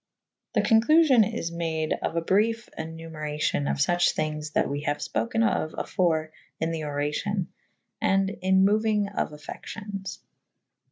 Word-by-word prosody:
The - - +3
conclufion 240 -1 +5
is 195 -8 -3
made 160 -2 -1
of - - -2
a 165 - +1
brife 225 +6 +1
enumeracion 155 -2 -3
of - - 0
fuche 175 +5 +2
thynges 155 -1 -3
that - - +2
we 145 +1 -3
haue 145 -1 0
fpoken 225 +8 0
of 155 - -1
afore 160 -3 0 0.3
in 160 +1 0
the 165 -1 -3
oracyon 150 +7 -1 0.6
and 195 0 +2
in 190 +1 +4
mouynge 210 -1 +2
of - - -1
affections. 195 +6 -7
170 Hz, 135 wpm, -26 LUFS, 155-210 Hz, 0.6 s, conclufion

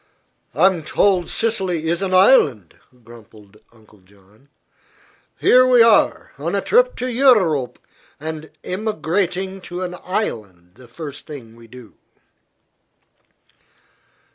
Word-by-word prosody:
"I'm 180 +3 +3
told 180 +3 0
Sicily 190 -8 -2
is 170 +2 -1
an 195 -1 -2
island," 155 - +3 0.3
grumbled 110 -3 -17
Uncle 110 -2 -23
John. 100 +7 -26 0.9
"Here 255 0 +5
we 250 -2 +5
are, 230 -2 +2
on - - -3
a - - 0
trip - - +2
to 250 - -5
Eu 255 +1 +4
rope, 155 - -1 0.4
and 155 0 -7
emigrating 190 -1 -3
to 180 +1 -7
an 180 -1 -5
island 105 - -5
the 125 +5 -17
first 145 +3 -10
thing 125 -7 -11
we 115 0 -17
do." 125 -1 -14
160 Hz, 115 wpm, -19 LUFS, 115-195 Hz, 0.9 s, Here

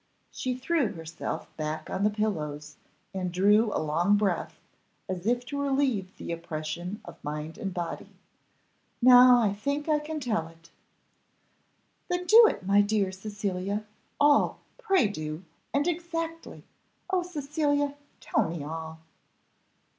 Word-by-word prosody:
She 255 -1 -3
threw 265 -3 0
herself 165 -2 -5
back 155 0 -3
on 195 - -2
the 210 - +4
pillows, 150 -9 -3 0.4
and 185 -2 -2
drew 205 +4 +4
a - - -1
long 170 +6 +2
breath, 200 -4 -1 0.5
as 185 0 -4
if 245 +1 +1
to 280 +2 -3
relieve 265 -9 0
the - - -6
oppression 170 +3 -5
of 170 -1 -12
mind 150 +4 -5
and 195 -4 -3
body. 175 -2 -5 0.9
"Now 250 0 +8
I 210 -4 +2
think 280 +9 -2
I 305 -1 +3
can 305 +1 -5
tell 215 - -1
it." 165 0 -19 1.4
"Then 355 0 -1
do, 445 +4 +8
my 200 +2 +4
dear 205 -2 +1
Cecilia 200 0 -3 0.3
all 290 0 +4 0.2
pray 390 - +3
do! 155 -3 -5 0.3
and 285 +3 +1
exactly 330 -1 -4 0.5
oh, 370 -1 +2
Cecilia, 290 -3 -1 0.3
tell - - +1
me 165 -3 -5
all." 160 +1 -6
205 Hz, 130 wpm, -28 LUFS, 170-280 Hz, 1.4 s, Now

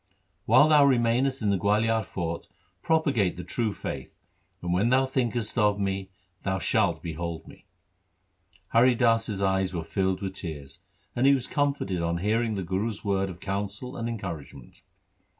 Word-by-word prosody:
4 - - +4
'While 150 - +8
thou 150 -2 +7
remainest 130 0 +2
in 105 - +2
the 100 - +1
Gualiar 110 +4 +2
fort 85 -2 -4 0.3
propagate 140 - +1
the 90 - -5
true 110 +5 -1
faith, - - -6 0.5
and, 85 0 -2
when 100 +6 +2
thou 130 +1 +4
thinkest 120 -3 -1
of 105 -1 +3
me, 95 -1 -2 0.3
thou 95 -1 -1
shalt 90 - +1
behold 85 0 -5
me.' - - -16 1.0
Hari 120 +2 +5
Das's 115 -4 +1
eyes 95 -1 +1
were 85 - -2
filled 95 +1 -1
with 95 -1 -3
tears, 75 -7 -7 0.3
but 120 - +1
he 140 0 +6
was 130 -3 -3
comforted 140 - -1
on 85 0 0
hearing 110 +4 0
the 95 - -3
Guru's 100 +5 -3
words 95 -1 0
of 90 -2 -9
counsel 100 +7 -4
and 115 0 -3
encouragement. 85 - -7
100 Hz, 165 wpm, -27 LUFS, 95-120 Hz, 1.0 s, While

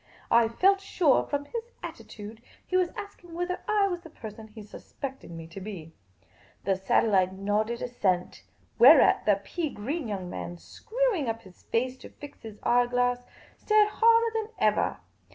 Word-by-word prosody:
I 230 0 +6
felt 385 - +3
sure, 350 -7 +2
from 285 0 -2
his 465 +6 -6
attitude, 215 +2 -9 0.2
he 370 - -3
was 365 -2 +3
asking 400 -5 -9
whether 355 +1 -2
I 420 -2 +3
was 355 -2 -3
the 330 - -12
person 220 -6 -10
he 215 0 -11
suspected 265 +5 -8
me 165 -1 -8
to 190 +4 -9
be. 180 -6 -8 0.7
The 195 - +1
satellite 190 0 +2
nodded 210 +4 -1
assent, 190 -8 -1 0.4
whereat 265 +1 +7
the 200 -2 +4
pea 330 - -3
green 275 +6 -4
young 195 -4 -4
man, 175 0 -6
screwing 440 - -1
up 225 0 -4
his 185 -2 -17
face 255 +3 -2
to - - -11
fix 290 0 -12
his 220 -2 -10
eye 245 0 +3
glass, 245 0 0 0.3
stared 425 -1 +3
harder 460 +1 +4
than 445 -1 -2
ever. - - +1
245 Hz, 165 wpm, -28 LUFS, -, 0.7 s, whereat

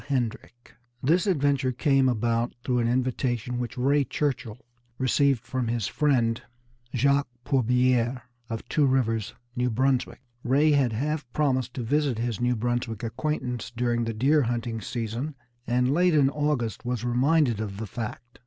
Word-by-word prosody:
Hendrick 120 -2 -3 0.3
This 170 +8 +3
adventure 140 -6 +2
came 135 0 +3
about 115 0 0
through 125 -1 +1
an 115 - +1
invitation 125 -1 -1
which 125 +1 -4
Ray 140 +3 +3
Churchill 130 -4 -3 0.3
received 130 -1 +2
from 130 -3 -2
his 115 -3 -1
friend, 120 -5 +1 0.5
Jacques 140 +3 +3 0.2
Pourbiere 125 -1 +2 0.3
of 115 -1 -5
Two 150 -2 +2
Rivers, 115 -5 0 0.2
New 125 0 +1
Brunswick. 130 +2 0 0.2
Ray 145 +5 +3
had 140 -5 +3
half 145 +2 -2
promised 130 -4 0
to 125 - -3
visit 140 0 +1
his 115 -1 -2
New 125 0 +2
Brunswick 120 -1 -2
acquaintance 125 0 -3
during 120 -1 +1
the 115 - -2
deer 140 +7 +3
hunting 115 -2 -2
season, 120 +6 -4 0.3
and 125 +2 +2
late 175 +1 +3
in 140 -2 +4
August 145 -7 -1
was 120 -1 -2
reminded 125 0 +2
of 100 -3 -5
the 110 - -4
fact. 120 +3 -7
125 Hz, 150 wpm, -26 LUFS, 120-140 Hz, 0.5 s, in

